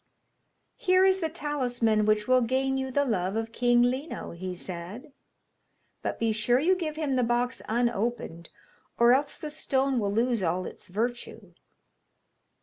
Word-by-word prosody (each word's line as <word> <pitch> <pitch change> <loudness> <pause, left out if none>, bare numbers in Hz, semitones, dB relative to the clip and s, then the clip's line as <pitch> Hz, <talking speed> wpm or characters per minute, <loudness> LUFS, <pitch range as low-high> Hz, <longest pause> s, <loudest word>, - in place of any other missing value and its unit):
'Here 370 0 +3
is 380 0 +4
the 325 -3 -1
talisman 245 -9 0
which 215 0 +2
will 255 0 +4
gain 265 +3 0
you 265 0 -2
the 285 +2 +1
love 195 -5 -1
of 225 0 -2
King 240 0 +3
Lino,' 260 +6 -2
he 180 +2 -6
said; 190 - -8 0.9
'but - - -3
be 230 -1 +1
sure 215 +3 +2
you 345 +8 +3
give 320 -4 -4
him 305 -3 -1
the 255 -1 +2
box 240 +2 0
unopened, 225 -7 -1 0.5
or 235 +1 +6
else 280 +2 0
the 305 - -6
stone 270 -3 0
will 200 -2 -1
lose 230 +1 +1
all 180 +1 -1
its - - -10
virtue.' 235 +6 -4
245 Hz, 155 wpm, -27 LUFS, 215-270 Hz, 0.9 s, or